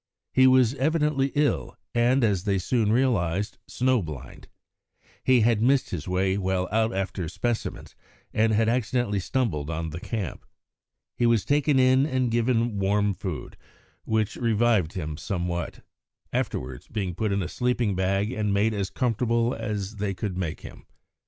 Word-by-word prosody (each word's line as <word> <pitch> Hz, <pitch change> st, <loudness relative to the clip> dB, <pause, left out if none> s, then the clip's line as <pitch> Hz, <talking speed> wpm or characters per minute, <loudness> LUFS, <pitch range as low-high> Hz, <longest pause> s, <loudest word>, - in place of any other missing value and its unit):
He 130 Hz, 0 st, +6 dB
was 130 Hz, -2 st, +5 dB
evidently 145 Hz, -1 st, +1 dB
ill, 145 Hz, 0 st, 0 dB, 0.2 s
and, 120 Hz, +2 st, +3 dB
as 100 Hz, -4 st, +1 dB
they 100 Hz, -2 st, +2 dB
soon 105 Hz, +3 st, +1 dB
realised, 105 Hz, -6 st, +1 dB
snow 130 Hz, -2 st, +1 dB
blind. 75 Hz, -6 st, -9 dB, 0.8 s
He 130 Hz, -2 st, +4 dB
had 110 Hz, -1 st, +3 dB
missed 135 Hz, +3 st, +2 dB
his 85 Hz, -5 st, -4 dB
way 95 Hz, +1 st, +1 dB
while 95 Hz, -1 st, 0 dB
out 110 Hz, +1 st, +2 dB
after 95 Hz, -3 st, -3 dB
specimens 120 Hz, +6 st, -3 dB, 0.4 s
and 110 Hz, +1 st, +3 dB
had 110 Hz, +1 st, +2 dB
accidentally 120 Hz, -3 st, 0 dB
stumbled 90 Hz, -, -1 dB
on 80 Hz, 0 st, -3 dB
the 80 Hz, -, -5 dB
camp. 100 Hz, -4 st, -4 dB, 0.7 s
He 120 Hz, -, +3 dB
was 115 Hz, -3 st, +2 dB
taken 145 Hz, 0 st, +2 dB
in 130 Hz, +2 st, +4 dB
and 130 Hz, -4 st, 0 dB
given 115 Hz, -2 st, +1 dB
warm 100 Hz, +1 st, +2 dB
food, -, -, -6 dB, 0.5 s
which 110 Hz, -2 st, -1 dB
revived 115 Hz, -7 st, +2 dB
him 80 Hz, -5 st, -4 dB
somewhat, 85 Hz, -1 st, -3 dB, 0.5 s
afterwards 65 Hz, -1 st, -3 dB
being 100 Hz, -5 st, -3 dB
put 105 Hz, +4 st, -1 dB
in 100 Hz, -1 st, 0 dB
a -, -, -3 dB
sleeping 120 Hz, 0 st, 0 dB
bag 95 Hz, +3 st, 0 dB
and 105 Hz, -4 st, -1 dB
made 105 Hz, +3 st, +2 dB
as 100 Hz, -3 st, -2 dB
comfortable 115 Hz, 0 st, 0 dB
as 105 Hz, -2 st, -4 dB
they 100 Hz, -1 st, -2 dB
could 100 Hz, -2 st, -3 dB
make 90 Hz, -4 st, -3 dB
him. -, -, -12 dB
110 Hz, 155 wpm, -26 LUFS, 95-120 Hz, 0.8 s, He